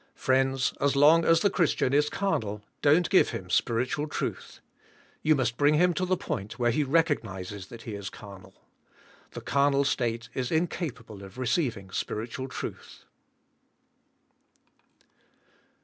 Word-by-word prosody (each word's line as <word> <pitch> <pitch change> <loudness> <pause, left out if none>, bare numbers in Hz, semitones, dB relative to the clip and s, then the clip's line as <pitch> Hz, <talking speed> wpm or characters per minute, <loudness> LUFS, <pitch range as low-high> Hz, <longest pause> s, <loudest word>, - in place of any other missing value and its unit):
Friends, 130 0 +1
as 140 0 +2
long" 155 +4 +6
as 165 0 +4
the 200 - +3
Christian 160 -7 +1
is 150 +1 +3
carnal 105 - -2 0.2
don't 155 +4 +4
g 190 - +5
ive - - +2
him 90 -1 -6
spiritual 125 - 0
truth. - - -5 0.6
You 155 0 +4
must 120 -3 -1
bring 145 +1 +4
him 175 +3 +3
to 185 +2 -2
the 185 0 +1
point 120 -9 -5
where 120 -2 +2
he 150 +6 +1
recog 155 +2 +2
nizes 95 -2 -8
that 115 +1 -11
he 110 - -6
is 100 -1 -5
carnal. 100 -2 -13 0.8
The - - -7
carnal 140 0 +2
state 120 -4 -1
is 125 -2 -3
incapable 140 - -3
of 95 +2 -12
receiving" 120 - -1
spiritual 115 +7 -4
truth. 125 - -8
130 Hz, 145 wpm, -27 LUFS, 115-150 Hz, 0.8 s, long